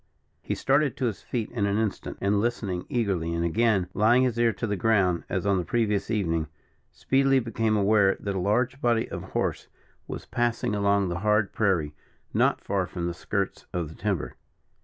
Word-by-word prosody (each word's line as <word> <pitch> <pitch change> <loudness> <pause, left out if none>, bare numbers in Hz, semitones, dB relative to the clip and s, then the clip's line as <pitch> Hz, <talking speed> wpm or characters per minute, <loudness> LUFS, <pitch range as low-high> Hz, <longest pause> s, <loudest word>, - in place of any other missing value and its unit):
He - - -3
started 140 +1 +1
to 130 - -1
his 115 -4 -2
feet 115 -4 -3
in 105 -4 0
an 100 +1 0
instant, 110 -3 -2
and 100 +1 +1
listening 105 -6 -2
eagerly, 95 -8 -1
and 85 0 0
again 105 +1 +2
laying 120 +5 +4
his 120 -2 0
ear 120 -1 +4
to 115 - -4
the 105 -2 -1
ground, 95 -3 +2
as 95 0 -2
on 100 -2 +2
the - - -1
previous 105 +1 0
evening, 85 -8 0 0.4
speedily 135 0 +2
became 115 -2 0
aware 100 -1 +3
that 100 - -3
a 95 - -2
large 120 +8 0
body 120 -2 +2
of - - -4
horse - - -3 0.4
was - - -6
passing 120 -1 -1
along 100 -2 +2
the 85 0 -3
hard 105 0 +2
prairie, 90 -9 +1 0.4
not - - +2
far - - -1
from 85 - -4
the 85 - -2
skirts 100 +2 -3
of 85 -4 -2
the 80 - -12
timber. 100 -6 -2
105 Hz, 190 wpm, -26 LUFS, 95-115 Hz, 0.4 s, laying